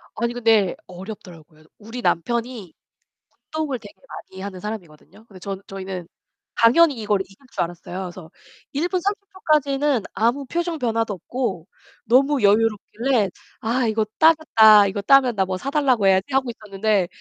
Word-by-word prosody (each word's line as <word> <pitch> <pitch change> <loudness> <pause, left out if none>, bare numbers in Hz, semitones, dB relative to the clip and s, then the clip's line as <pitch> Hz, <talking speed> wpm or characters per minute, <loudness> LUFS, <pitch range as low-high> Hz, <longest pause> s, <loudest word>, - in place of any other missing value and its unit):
아니 235 +2 -1
근데 225 -6 +2
어렵더라고요. 175 -5 -11
우리 225 +3 -8
남편이 235 0 -2 0.8
운동을 300 -6 -2
되게 205 -2 -13
많이 190 0 -10
하는 195 -2 -6
사람이거든요. 210 0 -9
근데 195 -5 -15
전 195 +1 -6
저희는 190 -3 -6 0.5
당연히 280 +6 +5
이걸 205 -2 +1
이길 195 +1 -20 0.2
줄 - - -1
알았어요. 175 +2 -6
그래서 175 -1 -10 0.4
1 310 +6 0
분 370 -2 -1
30 400 +2 -1
초까지는 290 - +1
아무 240 +6 0
표정 340 +3 -2
변화도 225 -3 -1
없고 195 -3 -4 0.4
너무 265 +2 +3
여유롭길래 220 +2 +2 0.3
'아 235 +2 0
이거 220 0 0
따겠다, 220 -11 +6
이거 200 +1 -3
따면 260 0 +4
나 190 -1 +1
뭐 185 0 -3
사달라고 265 -5 +1
해야지.' 190 +7 +2
하고 265 -2 +1
있었는데 205 -3 -1
220 Hz, 340 characters per minute, -22 LUFS, 195-260 Hz, 0.8 s, 따겠다